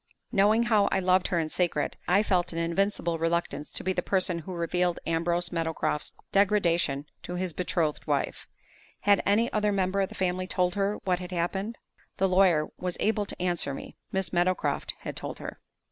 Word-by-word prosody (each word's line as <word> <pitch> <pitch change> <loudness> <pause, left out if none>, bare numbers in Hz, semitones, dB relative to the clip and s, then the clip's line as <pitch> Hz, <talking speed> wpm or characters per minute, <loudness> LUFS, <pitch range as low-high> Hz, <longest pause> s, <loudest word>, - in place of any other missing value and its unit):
Knowing 210 +4 +4
how 215 -4 +3
I - - +1
loved 185 0 +3
her 180 - 0
in 160 -2 0
secret, 165 -4 0
I 195 +4 +4
felt 185 -4 +1
an 165 - -6
invincible 170 0 0
reluctance 165 -2 -1
to - - -2
be 190 - 0
the 180 - 0
person 185 -2 +1
who 175 +3 -7
revealed 175 +1 0
Ambrose 170 +1 0
Meadowcroft's 160 -3 -2 0.2
degradation 175 -8 +2 0.2
to 180 - -6
his 180 -1 -2
betrothed 165 -3 -1
wife. - - -1 0.5
Had 200 -1 +4
any 220 +4 +3
other 210 -1 +2
member 195 0 +1
of 195 - 0
the - - -10
family 185 0 -1
told 180 -1 +1
her 200 +1 0
what 180 -2 +1
had 180 -1 -6
happened? 190 +6 -2 0.4
The 195 -1 +3
lawyer 180 -5 +4
was 180 -1 -3
able 210 -1 +1
to - - -5
answer 175 -6 0
me; - - -9 0.2
Miss 190 -1 -1
Meadowcroft 175 +1 +1
had - - -5
told - - -6
her. - - -7
180 Hz, 185 wpm, -28 LUFS, 170-195 Hz, 0.5 s, Knowing